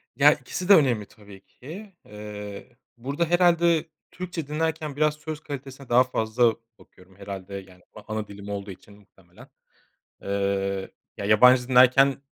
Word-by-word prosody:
Ya, - - +6
ikisi 185 +2 -6
de - - +10
önemli 120 -9 +2
tabii 100 -2 -16
ki, 190 - -11
eee, 105 +2 -9 0.2
burada 140 +7 -2
herhâlde 170 -1 +3 0.3
Türkçe 175 -5 -6
dinlerken 155 -1 -2
biraz 150 0 +2
söz 150 0 -7
kalitesine 140 -2 -9
daha 125 +2 +5
fazla 115 -1 +1 0.2
bakıyorum 95 +1 -20
herhâlde, 100 0 -8
yani, 95 -2 -11
a 105 0 -9
ana 110 -1 -3
dilim 100 0 -10
olduğu 100 -1 -5
için 100 +2 -15
muhtemelen. 95 -3 -19 0.7
Eee, 100 -1 -2 0.3
ya, 100 - -4
yabancı 125 +4 +5
dinlerken, 130 +2 +5
120 Hz, 140 wpm, -25 LUFS, 100-150 Hz, 0.7 s, de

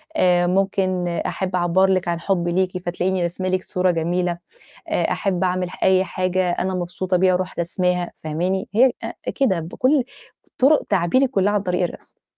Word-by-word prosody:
آآ 175 - +3
ممكن 185 -1 0
أحب 185 +2 -2
أعبّر 180 +2 +3
لكِ 185 -2 +1
عن 170 -1 -1
حبي 175 -2 0
ليكِ 185 0 0
فتلاقيني 180 +1 -1
راسمة 185 +2 -2
لكِ 185 0 0
صورة 180 0 +1
جميلة، 175 +1 -1 0.5
آآ - - 0
أحب 190 -2 -1
أعمل 180 0 0
أي 190 0 +4
حاجة 185 -1 -1
أنا 190 +2 -1
مبسوطة 180 +1 -1
بيها 185 0 +3
أروح 185 0 -2
راسماها، 180 +1 -1
فاهماني؟ 180 +7 -2
هي 255 +2 +5
آآ - - -5 0.2
كده، 225 - +2
بكُلّ 255 - +1 0.6
طُرُق 285 +4 +4
تعبيري 200 +8 +2
كُلّها 205 -4 +1
عن 205 -1 +1
طريق 180 -1 -1
الرسم. - - -9
185 Hz, 165 wpm, -21 LUFS, 175-190 Hz, 0.6 s, هي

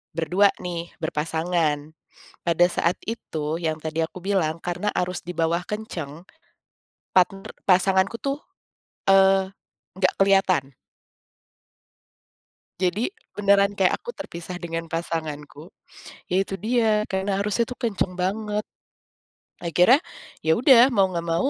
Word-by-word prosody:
berdua 175 +5 +3 0.2
nih, 170 -1 -4 0.2
berpasangan. 160 -1 -1 0.5
Pada 170 0 +4
saat 175 0 0
itu 160 -9 -3
yang 160 -1 -1
tadi 160 +1 -2
aku 165 +3 -6
bilang 175 -4 0
karena 180 +4 -2
arus 180 0 -2
dibawah 170 0 -1
kenceng, 180 -6 -6 0.8
partner 190 +1 +2 0.2
pasanganku 190 +3 +3
tuh, 275 0 -1 0.7
eee, 195 0 +4 0.4
nggak 185 -1 +2
keliatan. 190 -8 +2 2.1
Jadi 185 +6 +1 0.2
beneran 200 0 +3
kayak 190 -2 +3
aku 480 - -8
terpisah 175 - -8
dengan 165 -1 -4
pasanganku, 160 -2 -5 0.6
ya 180 - +1
itu - - -7
dia, 220 -2 +2
karena 195 +1 -1
arusnya 210 +3 +1
kenceng 210 -7 -2
banget. 210 +3 -2 1.0
Akhirnya, 180 - +5 0.5
ya 160 - +4
udah 255 0 +7
mau 205 -7 +3
nggak 170 0 -3
mau. 175 +11 +1
180 Hz, 110 wpm, -24 LUFS, 165-200 Hz, 2.1 s, udah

